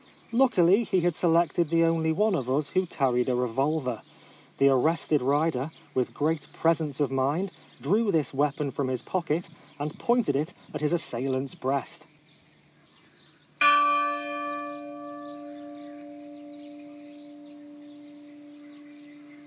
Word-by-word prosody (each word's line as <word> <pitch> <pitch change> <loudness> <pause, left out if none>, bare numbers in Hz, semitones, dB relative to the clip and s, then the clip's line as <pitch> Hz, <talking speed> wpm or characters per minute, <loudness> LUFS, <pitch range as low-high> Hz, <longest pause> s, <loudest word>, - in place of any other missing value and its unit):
Luckily 230 -5 +4
he 190 -4 0
had 175 0 +1
selected 170 0 +2
the 165 0 +3
only 165 -1 +1
one 210 +6 +1
of 130 -8 -2
us 145 +3 0
who 185 0 0
carried 130 -5 0
a 125 - +1
revolver. 125 - -1 0.6
The 135 - +4
arrested 150 +2 +2
rider, 145 +1 0 0.2
with 130 -2 -1
great 155 0 -2
presence 160 -4 0
of 145 -3 0
mind, 145 +9 0 0.3
drew 205 +8 +1
this 160 -5 0
weapon 145 0 -1
from 135 +1 -2
his 130 -2 -3
pocket, 170 -2 -2 0.3
and 150 +2 -5
pointed 235 - +1
it 150 +5 -2 0.2
at 150 - -5
his 150 - +1
assailant's 135 -4 -1
breast. 155 +5 -3
150 Hz, 105 wpm, -27 LUFS, 135-170 Hz, 0.6 s, Luckily